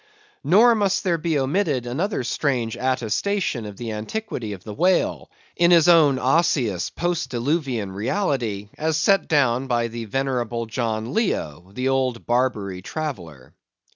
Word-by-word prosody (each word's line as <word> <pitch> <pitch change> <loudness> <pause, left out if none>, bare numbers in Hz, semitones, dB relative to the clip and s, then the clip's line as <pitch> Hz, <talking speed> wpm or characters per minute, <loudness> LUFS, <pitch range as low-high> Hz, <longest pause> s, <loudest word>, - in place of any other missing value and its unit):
Nor 230 +6 +6
must 200 -3 +1
there 175 -4 +1
be 160 -1 0
omitted 140 -2 0
another 155 - -2
strange 120 -4 -1
attestation 130 - -1
of 100 -2 -9
the 115 -2 -5
antiquity 115 - -4
of 95 - -10
the 105 - -7
whale, 180 - +1 0.3
in 170 0 +4
his 170 -1 +6
own 155 -6 +6
osseous 130 - +1
post 175 -1 -2
diluvian 125 - -1
reality, 110 - -2
as 155 0 0
set 195 +4 +3
down 135 -4 +2
by 120 -2 0
the 115 0 -6
venerable 120 -1 -2
John 110 +1 -3
Leo, 90 - -2
the 125 +5 -1
old 130 -3 0
Barbary 110 -7 0
traveller. 90 - -6
130 Hz, 140 wpm, -23 LUFS, 115-165 Hz, 0.3 s, Nor